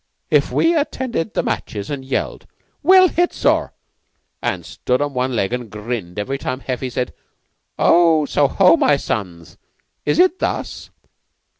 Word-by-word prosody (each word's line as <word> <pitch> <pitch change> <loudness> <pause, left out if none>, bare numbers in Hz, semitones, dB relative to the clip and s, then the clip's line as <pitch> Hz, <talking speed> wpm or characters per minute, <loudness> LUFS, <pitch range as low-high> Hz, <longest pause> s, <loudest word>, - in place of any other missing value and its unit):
"If - - +3
we 335 +1 +2
attended 255 - -2
the - - +1
matches 100 +2 -4
an' 140 -2 -3
yelled, 130 +1 -3 0.3
'Well 370 +3 +7
hit, 350 +1 0
sir,' - - +1 0.7
an' - - -2
stood 125 0 -2
on 145 -1 -2
one 130 0 -1
leg 100 0 0
an' 125 -2 -4
grinned 105 -4 -5
every 135 +7 -3
time 130 0 -4
Heffy 130 0 -3
said, 125 +1 -3 0.6
'So 165 -3 +4 0.2
ho, 180 +3 +4
my 145 - +3
sons. 90 - -5 0.4
Is 150 - 0
it 365 0 +4
thus? - - -3
135 Hz, 145 wpm, -19 LUFS, 120-180 Hz, 0.7 s, Well